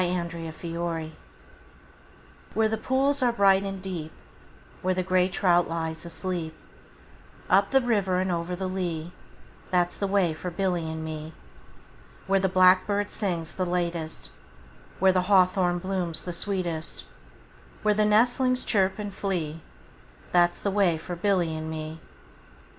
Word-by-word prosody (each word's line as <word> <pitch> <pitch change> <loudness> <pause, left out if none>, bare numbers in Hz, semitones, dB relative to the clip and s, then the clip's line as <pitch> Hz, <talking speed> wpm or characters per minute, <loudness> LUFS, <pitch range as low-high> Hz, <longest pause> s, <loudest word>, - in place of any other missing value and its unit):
A 180 0 0
Boy's 165 -1 -6
Song 165 -2 -3 1.4
WHERE 220 -1 +3
the 220 - 0
pools 265 +5 +1
are 245 -1 +4
bright 195 -4 +4
and 195 -1 -4
deep, 170 -5 -5 0.7
Where 185 0 +1
the 185 - 0
grey 185 0 +2
trout 175 -3 +2
lies 160 0 -3
asleep, 165 -1 -4 1.0
Up 195 +2 +5
the 270 0 +4
river 205 -7 +1
and 185 0 0
over 170 +1 -2
the 190 +1 -4
lea, 175 -3 -3 0.6
That 175 -1 +2
's - - -11
the 200 - 0
way 190 -4 +2
for 180 +3 -5
Billy 175 -2 -1
and 160 0 -5
me. 155 0 -6 0.9
Where 195 0 +3
the 190 0 +1
blackbird 185 +2 +4
sings 170 -6 -2
the 185 - -2
latest, 170 -2 -2
5 - - -22 0.7
Where 190 -1 +6
the 185 - +3
hawthorn 185 -2 +4
blooms 180 -3 -2
the 175 - -5
sweetest, 170 -4 -3 0.8
Where 210 0 +4
the 210 +1 +2
nestlings 245 +4 +3
chirp 190 -3 +2
and 205 -2 -5
flee, 165 -6 -3 0.7
That 175 -1 +4
's - - -12
the 200 - 0
way 190 -5 +3
for 175 +3 -6
Billy 175 -3 +1
and 155 0 -5
me. 160 0 -5
180 Hz, 155 wpm, -26 LUFS, 170-195 Hz, 1.4 s, Where